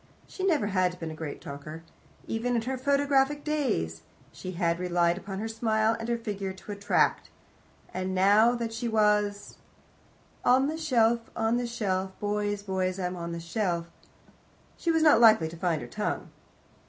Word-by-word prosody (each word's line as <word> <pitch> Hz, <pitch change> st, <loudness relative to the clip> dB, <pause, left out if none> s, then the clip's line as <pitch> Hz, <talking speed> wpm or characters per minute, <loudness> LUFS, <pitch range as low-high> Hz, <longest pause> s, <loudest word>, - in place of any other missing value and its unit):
She 375 Hz, -, -7 dB
never 325 Hz, -, +2 dB
had 185 Hz, -3 st, 0 dB
been 165 Hz, -1 st, -5 dB
a -, -, -7 dB
great 155 Hz, -2 st, -6 dB
talker. 155 Hz, +3 st, -8 dB, 0.4 s
Even 240 Hz, +2 st, -1 dB
in 230 Hz, -, 0 dB
her 260 Hz, +3 st, -2 dB
photographic 280 Hz, +1 st, +2 dB
days 245 Hz, -, -1 dB, 0.3 s
she 185 Hz, -, -7 dB
had 170 Hz, -1 st, 0 dB
relied 175 Hz, -1 st, +2 dB
upon 195 Hz, +1 st, -6 dB
her 220 Hz, +3 st, -3 dB
smile 220 Hz, 0 st, +1 dB
and 225 Hz, +1 st, -5 dB
her 235 Hz, -, +1 dB
figure 200 Hz, -4 st, -4 dB
to 190 Hz, +2 st, -10 dB
attract, 205 Hz, 0 st, +1 dB, 0.6 s
and 185 Hz, 0 st, -2 dB
now 205 Hz, +5 st, +5 dB
that 230 Hz, -1 st, -3 dB
she 230 Hz, +1 st, -3 dB
was 210 Hz, -2 st, +1 dB, 0.9 s
"On 255 Hz, +2 st, +4 dB
the 310 Hz, +3 st, -2 dB
shelf, 235 Hz, -6 st, +2 dB
On 225 Hz, +1 st, +1 dB
the 245 Hz, 0 st, -1 dB
shelf, 190 Hz, -5 st, -2 dB
Boys, 205 Hz, 0 st, -1 dB
boys, 190 Hz, -1 st, -1 dB
I'm 180 Hz, 0 st, -2 dB
on 170 Hz, -1 st, -5 dB
the 170 Hz, -, -4 dB
shelf," 170 Hz, -1 st, -2 dB, 0.8 s
she 340 Hz, -, -3 dB
was 325 Hz, -1 st, +3 dB
not 300 Hz, -6 st, +6 dB
likely 215 Hz, -8 st, +6 dB
to 165 Hz, -, -10 dB
find 165 Hz, -2 st, -1 dB
her -, -, -8 dB
tongue. 210 Hz, -, -3 dB
210 Hz, 170 wpm, -28 LUFS, 180-235 Hz, 0.9 s, not